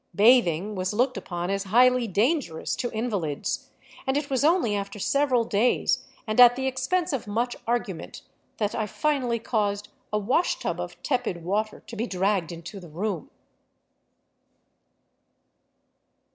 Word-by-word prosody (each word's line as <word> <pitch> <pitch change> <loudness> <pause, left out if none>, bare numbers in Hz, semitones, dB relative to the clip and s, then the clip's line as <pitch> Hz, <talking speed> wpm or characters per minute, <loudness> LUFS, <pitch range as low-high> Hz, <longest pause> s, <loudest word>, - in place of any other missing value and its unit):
Bathing 210 -4 +4
was 185 +1 -2
looked 255 +3 +2
upon 175 +1 -4
as 195 0 -1
highly 250 +4 +4
dangerous 215 - 0
to 245 - -2
invalids, 205 -11 -2 0.4
and 265 +1 +2
It 290 -1 -3
was 265 0 +1
only 315 - +3
after 200 0 -4
several 260 +2 +2
days, 230 +2 +1 0.2
and 215 0 -1
at 245 -1 +9
the 265 - -3
expense 265 +7 0
of 250 -6 -3
much 235 +4 -1
argument, 225 -8 -3 0.3
that 210 -1 -1
I 215 -2 -1
finally 265 -4 0
caused 210 -3 -1 0.2
a 210 - +1
wash 255 - +1
tub - - -3
of - - -6
tepid 245 - -1
water 210 +5 -1
to 235 - -9
be 230 +2 -2
dragged 190 -3 0
into 170 +4 -8
the 175 -3 -12
room. 180 +2 -3
220 Hz, 145 wpm, -26 LUFS, 195-255 Hz, 0.4 s, at